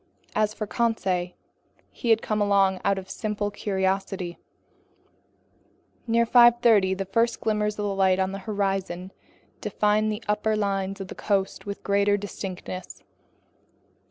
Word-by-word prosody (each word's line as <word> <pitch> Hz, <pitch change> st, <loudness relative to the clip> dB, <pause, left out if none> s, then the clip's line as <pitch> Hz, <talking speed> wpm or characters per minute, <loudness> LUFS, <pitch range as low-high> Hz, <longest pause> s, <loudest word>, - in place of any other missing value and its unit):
As 215 Hz, 0 st, +1 dB
for 215 Hz, -, -3 dB
Conseil, 195 Hz, -6 st, -1 dB, 0.6 s
he 235 Hz, -, -4 dB
had 225 Hz, -1 st, +4 dB
come 215 Hz, -1 st, -1 dB
along 195 Hz, -2 st, +3 dB
out 200 Hz, -1 st, +2 dB
of 190 Hz, -1 st, -6 dB
simple 210 Hz, -1 st, -3 dB
curiosity. 190 Hz, -3 st, -2 dB, 1.7 s
Near 235 Hz, 0 st, +3 dB
5:30 235 Hz, -5 st, +5 dB
the 195 Hz, -, -2 dB
first 230 Hz, +5 st, +1 dB
glimmers 210 Hz, -1 st, 0 dB
of 210 Hz, -, -2 dB
light 195 Hz, -2 st, +2 dB
on 190 Hz, 0 st, 0 dB
the 195 Hz, -, -5 dB
horizon 195 Hz, -3 st, -2 dB, 0.5 s
defined 215 Hz, +1 st, +1 dB
the 210 Hz, +2 st, -5 dB
upper 210 Hz, +1 st, +1 dB
lines 195 Hz, -1 st, -1 dB
of 190 Hz, -, -6 dB
the -, -, -6 dB
coast 200 Hz, -1 st, -1 dB
with 200 Hz, -, -6 dB
greater 200 Hz, 0 st, +2 dB
distinctness. 185 Hz, -2 st, -7 dB
200 Hz, 130 wpm, -25 LUFS, 190-215 Hz, 1.7 s, 5:30